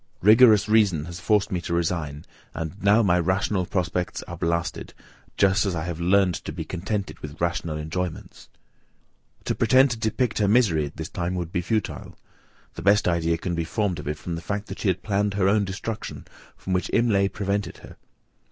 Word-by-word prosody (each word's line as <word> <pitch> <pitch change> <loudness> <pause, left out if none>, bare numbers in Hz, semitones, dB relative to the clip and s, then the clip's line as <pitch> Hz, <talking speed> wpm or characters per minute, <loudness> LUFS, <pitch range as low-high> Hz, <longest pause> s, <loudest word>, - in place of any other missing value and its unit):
Rigorous 110 0 +7
reason 100 -8 +3
has 85 0 -8
forced 105 +3 +1
me 90 -2 -1
to 85 - -2
resign; 80 -4 -2 0.3
and 80 +5 -5
now 105 +3 +5
my 90 -3 +3
rational 95 +1 0
prospects 90 -1 -2
are - - -8
blasted, 85 0 -2 0.4
just 95 0 +3
as 95 -4 -1
I 80 - -2
have 85 -1 -5
learned 95 +1 +3
to - - -5
be - - -6
contented 100 +3 -4
with 75 +1 -9
rational 85 -2 -1
enjoyments." 80 +3 -5 1.0
To - - 0
pretend 130 +1 +4
to 115 - -2
depict 110 +1 0
her 105 - +2
misery 100 -10 +3
at 70 - -13
this 80 -1 -4
time 90 +1 -3
would 85 -2 -4
be 90 - -1
futile; 110 +4 -3 0.6
the - - -8
best 100 +2 +3
idea 85 -1 +1
can 85 +2 -3
be 85 -1 -1
formed 95 +1 -1
of - - -8
it 75 +1 -2
from 85 - -6
the 85 - -4
fact 100 +4 -3
that - - -7
she - - -2
had 90 -1 0
planned 100 -1 0
her 95 -2 +2
own 100 +1 +3
destruction, 100 +4 -6 0.3
from 95 - -4
which 90 - 0
Imlay 105 -5 +3
prevented 100 -2 -3
her. - - -13
95 Hz, 195 wpm, -24 LUFS, 85-105 Hz, 1.0 s, Rigorous